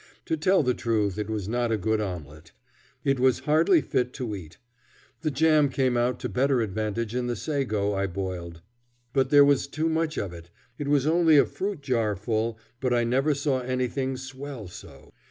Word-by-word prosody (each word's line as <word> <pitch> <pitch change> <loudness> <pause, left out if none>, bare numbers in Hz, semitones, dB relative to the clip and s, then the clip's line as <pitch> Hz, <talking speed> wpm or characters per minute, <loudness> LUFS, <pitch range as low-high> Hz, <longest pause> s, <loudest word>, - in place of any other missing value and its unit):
To 160 - 0
tell 185 +2 +3
the 125 -1 +2
truth, 105 -5 -1
it 105 0 -3
was 105 -3 -3
not 120 +1 0
a 110 - +2
good 110 +1 0
omelet. 80 -5 -7 0.5
It 135 -2 +1
was 130 -1 +3
hardly 160 - +4
fit 125 0 -1
to 120 -6 -4
eat. 85 -4 -10 0.6
The 160 - 0
jam 150 0 +3
came 130 -2 +1
out 120 +1 +1
to - - -2
better 130 +5 +1
advantage 110 +1 -2
in 125 0 -1
the 120 - -1
sago 105 -4 -1
I 100 0 0
boiled, 85 -3 -5 0.5
but 135 -1 +2
there 145 0 +7
was 140 -1 +2
too 160 +2 -1
much 160 0 -1
of 95 -3 -3
it. 85 0 -11 0.3
It 145 - -3
was 145 -1 +2
only 160 -1 +5
a - - +6
fruit 195 -5 -4
jar 115 -6 0
full, 110 +3 -2 0.2
but 125 -2 +1
I 120 - +2
never 135 +5 +1
saw 140 -2 0
anything 130 +1 -2
swell 130 -3 -8
so. 90 - -13
125 Hz, 190 wpm, -26 LUFS, 105-140 Hz, 0.6 s, there